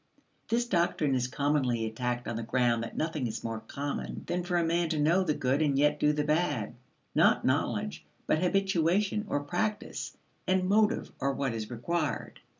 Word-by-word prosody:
This 235 +1 +1
doctrine 170 - +1
is 125 -1 +1
commonly 130 -4 0
attacked 120 +2 -3
on 115 - -3
the 115 - -3
ground 120 0 +1
that 115 - -6
nothing 155 -5 -1
is 110 0 -5
more 115 -1 -3
common 140 +6 -5
than 180 0 -1
for 175 0 0
a 170 - +2
man 170 0 +1
to 155 -2 -1
know 170 +6 +3
the 155 -5 0
good 135 +3 +1
and 145 -3 +2
yet 150 +1 +3
do 150 - +4
the 150 0 0
bad: 150 -8 0 0.4
not - - +4
knowledge, - - 0 0.2
but 155 - +2
habituation 195 +2 +2
or 145 - 0
practice, 190 +9 -3 0.3
and 185 0 +2
motive 215 +3 +2
are 140 0 0
what 135 -3 -1
is 110 -2 -4
required. 150 +6 -2
150 Hz, 180 wpm, -30 LUFS, 125-175 Hz, 0.4 s, do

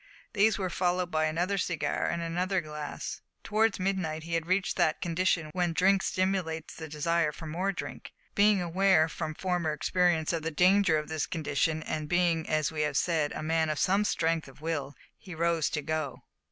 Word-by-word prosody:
These 215 +1 +3
were 185 -3 -2
followed 180 0 0
by 155 0 +2
another 175 +5 0
cigar 170 -4 -1
and 170 0 -2
another 180 +3 0
glass. 150 -2 -6 0.2
Towards 220 -1 +1
midnight 185 -5 -1
he 165 +1 -6
had 165 0 0
reached 185 +1 +1
that 170 -4 +2
condition 170 -2 0
when 175 -2 0
drink 190 +3 +4
stimulates 185 -5 -1
the 160 - -7
desire 155 +1 0
for 160 +2 -10
more 175 +5 -1
drink. 185 - -7 0.2
Being 205 -2 +4
aware, 175 -1 +3
from 155 -1 -5
former 175 -4 -1
experience, 170 +1 +1
of 165 - -1
the 160 - -2
danger 180 +1 +4
of 150 - -3
this 155 -2 -2
condition, 155 0 -1
and 150 -1 -4
being, 175 -2 +1
as 155 -1 +1
we 155 -1 -2
have 150 -2 0
said, 160 -4 +1
a - - -5
man 160 0 +1
of 155 - -1
some 195 +6 +2
strength 165 -5 0
of 135 - -15
will, 145 -3 -3 0.2
he 180 -3 -9
rose 165 -1 +1
to 150 - -3
go. 155 -2 -3
165 Hz, 190 wpm, -29 LUFS, 155-185 Hz, 0.2 s, drink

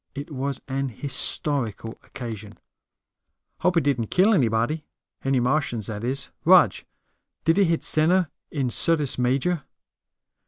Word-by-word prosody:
It 145 +3 -7
was 140 0 -3
an 135 0 -2
historical 125 -2 +1
occasion. 110 -5 -8 1.0
"Hope 180 -1 +1
it 165 - +3
didn't 125 -6 0
kill 195 - +3
anybody. 125 - 0 0.4
Any 135 -1 +1
Martians, 125 -4 -1
that 105 0 -5
is. 130 +3 -3
Rog, - - +6 0.7
did 165 +4 +3
it 200 - +5
hit 165 -1 0
dead - - -18
center 170 +2 +2 0.2
in 135 -5 -2
Syrtis 150 -5 +2
Major?" 135 +7 0
135 Hz, 130 wpm, -24 LUFS, 120-155 Hz, 1.0 s, Rog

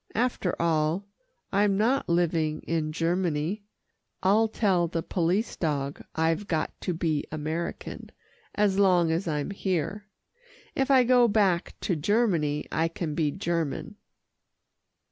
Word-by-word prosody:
"After 230 -6 0
all, 165 +3 +1 0.5
I'm 200 0 +2
not 240 +4 +1
living 165 -3 +1
in 160 -2 -1
Germany. 170 +3 -1 0.6
I'll 210 +4 +4
tell 190 -6 +1
the 165 -1 -3
police 185 +6 0
dog 145 -4 -2
I've 165 +5 0
got 160 -2 -1
to 180 - -1
be 160 -3 -1
American, 155 +2 -4 0.4
as 200 -2 +2
long 180 -4 +4
as 170 +3 -1
I'm 150 +2 -2
here. 195 +1 -2 0.7
If 270 0 0
I 265 -2 +6
go 245 0 +5
back 200 -5 +1
to 180 - 0
Germany, 160 -5 +1
I 165 +1 +1
can 165 -2 -4
be 155 -1 +1
German." 170 +3 -3
175 Hz, 125 wpm, -27 LUFS, 160-205 Hz, 0.7 s, I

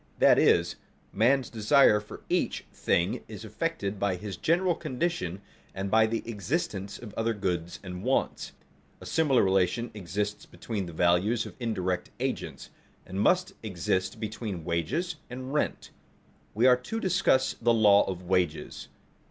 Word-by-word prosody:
That - - +6
is, - - +3 0.4
man's 130 +3 +3
desire 110 0 +5
for 105 - -11
each - - -1
thing 85 - 0
is - - -8
affected 100 0 -3
by 100 -2 +1
his 95 +1 -6
general 175 - +2
condition 130 - -3 0.3
and 95 0 -3
by 110 0 +5
the 115 +1 -2
existence 105 - -3
of 110 -4 -10
other 115 0 -1
goods 90 -4 -3
and 90 -1 -6
wants. 130 +5 -1 0.5
A - - -11
similar 150 -6 +3
relation 95 +5 +1
exists 105 +1 -4
between 105 -5 -5
the - - -7
values 90 +8 +2
of - - -8
indirect 95 -7 -2
agents, - - -4 0.3
and 95 +2 -3
must 180 - +2
exist 95 -2 -2
between 105 -5 -5
wages 120 - -1
and 130 +2 -6
rent. 150 - -1 0.6
We 115 +4 +3
are 125 -1 +7
to 175 - -5
discuss 185 -10 +2
the 120 0 +4
law 105 -3 +6
of 90 -1 -5
wages. 90 -3 -1
105 Hz, 145 wpm, -28 LUFS, 95-125 Hz, 0.6 s, are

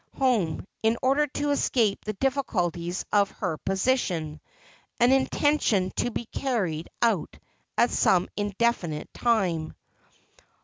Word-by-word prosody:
371 230 - +1
home, - - -11
in 225 +1 +2
order 275 +3 +3
to 290 +1 -2
escape 230 -7 +1
the 215 - -2
difficulties 185 - -1
of 205 -1 +4
her 180 -6 -4
position; 190 - -1 0.6
an 240 +2 +5
intention 265 -8 +2
to 245 - 0
be 235 - -4
carried 195 - -2
out 220 -8 +1 0.4
at 240 - +4
some 180 -1 +3
indefinite 205 -6 -1
time. 185 -10 0
215 Hz, 120 wpm, -26 LUFS, 180-255 Hz, 0.6 s, an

